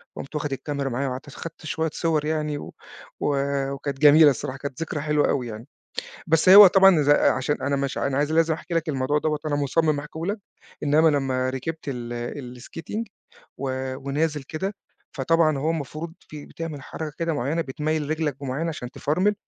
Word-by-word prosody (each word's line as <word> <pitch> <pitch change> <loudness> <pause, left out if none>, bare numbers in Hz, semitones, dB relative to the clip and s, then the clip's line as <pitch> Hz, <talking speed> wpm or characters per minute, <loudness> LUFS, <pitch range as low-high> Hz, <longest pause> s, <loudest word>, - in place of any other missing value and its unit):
قُمت 140 - -8
واخد 150 -1 -2
الكاميرا 140 0 -3
معايا 135 +3 -1
وقعدت 130 +2 -5
أصو 145 - -11
خدت 165 0 -8
شوية 160 +1 -1
صور 160 -3 0
يعني، 150 -1 -1
و - - -9 0.5
و 145 - +1 0.4
وكانت 140 -1 -5
جميلة 150 +1 +8
الصراحة، 135 +1 -4
كانت 140 +2 -6
ذكرى 155 -2 -3
حلوة 150 0 +2
أوي 125 -3 0
يعني. 110 +2 -8 0.6
بس 165 +2 +3
هو 200 +2 +12
طبعًا 190 -4 +6
ز 145 - -1
عشان 145 -1 +2
أنا 140 +1 0
مش 140 -1 -2
أنا 135 -1 -1
عايز 150 +1 +1
لازم 160 0 +3
أحكي 170 - -6
لك 165 0 0
الموضوع 145 +1 +1
دوّة 155 0 0
وأنا 145 -2 0
مُصمم 150 +2 +1
أحكيه 150 +2 -9
لك. 205 +3 -1 0.4
إنما 150 +2 +4
لمّا 130 -3 +1
ركبت 155 +5 -5
ال 120 0 -5
الskating، 165 - -5 0.5
و 130 -1 -3
ونازل 145 +2 -1
كده، 190 +9 -4 0.4
فطبعًا 155 +1 +2
هو 155 +4 0
المفروض 160 +1 -4
فيه 150 -1 -11
بتعمل 160 -4 -6
حركة 155 +3 -6
كده 165 0 0
مُعيّنة 145 +5 -1
بتميّل 150 +1 -2
رجلك 155 -3 -1
بمُعيّنة 140 +5 -2
عشان 125 -6 -5
تفرمل، 185 +8 +1
150 Hz, 180 wpm, -24 LUFS, 135-160 Hz, 0.6 s, هو